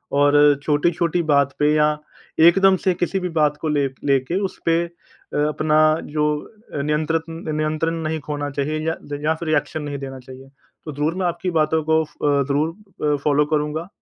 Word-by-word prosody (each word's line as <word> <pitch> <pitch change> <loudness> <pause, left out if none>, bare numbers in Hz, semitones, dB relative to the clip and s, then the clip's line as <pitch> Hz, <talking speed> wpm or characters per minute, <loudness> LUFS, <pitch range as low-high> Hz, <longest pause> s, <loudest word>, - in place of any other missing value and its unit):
और 145 0 +4 0.3
छोटी-छोटी 170 +3 +1
बात 140 -1 +3
पे 150 0 +3
या 150 0 +4 0.6
एकदम 195 +2 +5
से 185 - +4
किसी 180 +2 -1
भी 180 -1 -3
बात 150 -1 +3
को 160 - -2
लेक 140 -3 0
लेके 135 +5 +1
उस - - -18
पे 165 - +3
अ 170 -3 -12
अपना 155 0 +1 0.4
जो 150 -1 +1 0.6
नियंत्न 155 +2 0 0.4
नियंत्रण 155 +2 -1
नहीं 155 0 -2
खोना 145 -1 -2
चाहिए 145 +2 -2
या 160 - 0 0.3
या 160 +1 +2
फिर 165 0 -7
रिएक्शन 155 0 0
नहीं 145 -1 -4
देना 135 -1 -7
चाहिए। 130 +1 -13 0.4
तो 155 - -5
ज़रूर 150 +3 -1
मैं 185 0 -1
आपकी 180 +1 -2
बातों 155 0 +2
को 160 0 +2
फ़ 140 -1 +1
ज़रूर 155 +1 -1
फ़ॉलो 150 0 +3
करूँगा 150 +3 -2
155 Hz, 170 wpm, -21 LUFS, 145-165 Hz, 0.6 s, एकदम